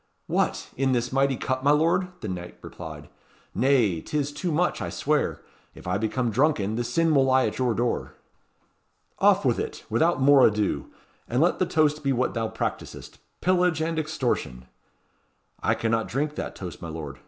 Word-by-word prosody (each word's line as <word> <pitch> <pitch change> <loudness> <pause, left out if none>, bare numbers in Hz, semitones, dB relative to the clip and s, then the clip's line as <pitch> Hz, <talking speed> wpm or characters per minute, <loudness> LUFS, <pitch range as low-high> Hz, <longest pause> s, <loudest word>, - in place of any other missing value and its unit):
"What! - - -1
in 135 0 +1
this 120 +1 -1
mighty 135 -1 +2
cup, 130 +1 -2
my 145 - +3
lord?" 165 +5 +3
the 110 - -4
knight 90 -2 -6
replied. 80 -3 -9 0.5
"Nay, 120 - +2
'tis 145 - -2
too 165 +4 -3
much, 175 +4 0
I - - -3
swear. - - -1 0.3
If - - -13
I 90 +2 -1
become 115 +2 -1
drunken, 115 -4 +1
the 120 - -1
sin 160 +7 +1
will 135 -2 +4
lie 130 0 +3
at - - -3
your 125 -3 +1
door." 120 +1 -2 1.0
"Off - - +4
with - - +2
it! - - -5
without 160 +9 +2
more 135 0 +6
ado. 105 -1 -1 0.4
And 120 - 0
let 170 +4 +2
the 185 - +1
toast 155 -3 +1
be 140 -1 +1
what 125 0 0
thou 115 -1 -1
practisest - - -5 0.2
'Pillage 180 -3 +2
and 160 0 -1
Extortion!'" 125 - -2 1.0
"I - - +2
cannot 115 0 0
drink 145 +4 -2
that - - -5
toast, 90 -3 -8
my 85 - -6
lord. 75 -4 -7
130 Hz, 175 wpm, -25 LUFS, 110-150 Hz, 1.0 s, more